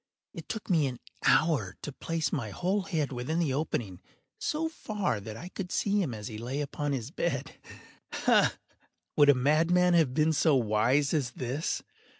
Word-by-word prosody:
It - - -9
took 220 - -4
me 160 -7 +3
an 125 -2 -5 0.3
hour 135 - +3
to 145 - -4
place 160 +1 -2
my 125 -7 -2
whole 185 - 0
head 155 -8 -1
within 130 +6 -2
the 160 -6 +1
opening 115 - -2 0.4
so 325 -7 -1
far 210 - -2
that 110 +2 -8
I 175 - -8
could 185 -1 -6
see 205 0 +1
him 160 -9 -1
as 105 0 -6
he 110 -3 -7
lay 125 +5 -3
upon 145 0 -2
his 125 -5 -3
bed. - - -2 0.5
Ha!—would 145 -1 +1
a 145 - +7
madman 165 +7 +3
have 155 -7 +3
been 155 +1 +3
so 155 -1 +3
wise 125 +4 +2
as 140 -6 +1
this? 130 +5 -2
145 Hz, 170 wpm, -29 LUFS, 125-170 Hz, 0.5 s, a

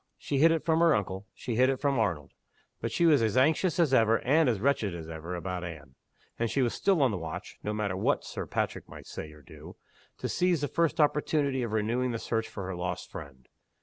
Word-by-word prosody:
She 140 - -2
hid 165 +3 +6
it 165 -1 0
from 160 -1 +3
her 170 -1 +5
uncle, 95 0 -3
she 120 -3 -4
hid 130 +1 +5
it 135 -1 0
from 140 -3 +1
Arnold 85 -10 -1 0.5
but - - -2
she 170 - +2
was 150 -5 +5
as 110 +1 +1
anxious 160 +6 +3
as 155 -6 +3
ever, 115 -2 +5
and 150 +3 +3
as 110 -5 0
wretched 115 -6 +1
as 80 -2 -7
ever, 80 +2 -6
about 90 0 -4
Anne; 75 -6 -8 0.5
and 115 0 0
she 135 - +1
was 120 - 0
still 190 -7 +2
on 130 - +3
the 95 - -3
watch 85 +4 -7
(no 105 - -3
matter 105 -3 -2
what 95 - +1
Sir - - -5
Patrick - - -3
might - - -11
say 75 - -7
or 75 -1 -16
do) - - -12 0.4
to - - -3
seize 180 -3 +1
the 145 - 0
first 165 +2 0
opportunity 145 -2 +2
of 115 -3 -3
renewing 120 +4 0
the - - -1
search 115 0 -2
for 100 - -6
her 95 0 -4
lost 90 +1 -4
friend. 65 -3 -10
115 Hz, 235 wpm, -29 LUFS, 90-145 Hz, 0.5 s, hid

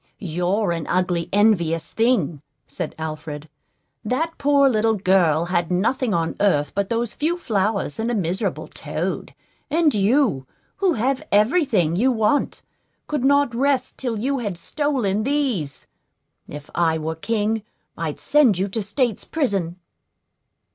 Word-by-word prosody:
"You're 180 +3 -1
an 165 -3 -3
ugly, 180 -2 0
envious 180 -6 +2
thing," 225 - +1 0.2
said 175 -4 -5
Alfred. 155 -1 -6 0.6
"That 305 +9 -1
poor 280 -1 +4
little 225 -2 +2
girl 180 -5 +3
had 175 -1 0
nothing 225 +7 0
on 165 -3 0
earth 150 -8 +2
but 200 -1 -1
those 230 -1 -1
few 330 +4 -1
flowers 205 - -1
and 225 +1 -1
a 240 - 0
miserable 185 -1 -2
toad; - - -4 0.3
and 315 -2 +3
you, 205 - +2 0.3
who 385 -3 +2
have 255 +4 0
every 235 - +4
thing 175 - +1
you 250 +8 +3
want, 235 +5 0 0.4
could 295 -4 -2
not 280 -2 +3
rest 260 +1 0
till 240 -4 -2
you 270 +5 -1
had 205 -7 -3
stolen 230 - -1
these. 245 - -1 0.6
If 145 0 -9
I 165 -2 +2
were 160 +1 -3
king, 220 +5 -1 0.3
I'd 160 -3 -4
send 275 -10 +4
you 190 +2 0
to 220 +3 -3
state's 230 +2 -1
prison." 200 - -1
210 Hz, 140 wpm, -22 LUFS, 170-255 Hz, 0.6 s, poor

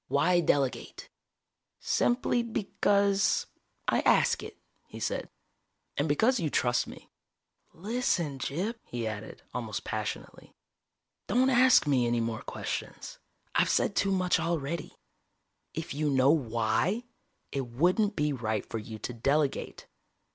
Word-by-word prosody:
Why 175 +5 +3
delegate?" 145 - -1 0.7
"Simply 245 0 +1
because, 200 -3 +1 0.4
I - - +3
ask - - +3
it," - - -9 0.3
he - - -10
said. - - -2 0.7
"And 145 +2 0
because 225 - +3
you 160 -4 0
trust 120 -3 +1
me. - - -12 0.6
Listen, 175 - -1
Gyp," 190 - -2
he 120 -2 -4
added, 110 -2 -6
almost - - -4
passionately. - - -5 0.7
"Don't 255 +5 +3
ask 255 -4 +6
me 130 -5 +2
any 120 0 +1
more 115 -1 -2
questions. - - -5 0.3
I've - - +3
said 200 - +1
too 195 - +2
much 185 -2 +2
already. 165 -1 -3 0.8
If 160 -2 -4
you 150 +1 0
know 135 0 +4
why, 120 - +1 0.5
it 135 -2 -2
wouldn't 180 - +2
be 150 0 +1
right 110 -4 -2
for 115 - -4
you 110 +1 -8
to 125 - -5
delegate. 140 +4 0
150 Hz, 125 wpm, -29 LUFS, 125-200 Hz, 0.8 s, ask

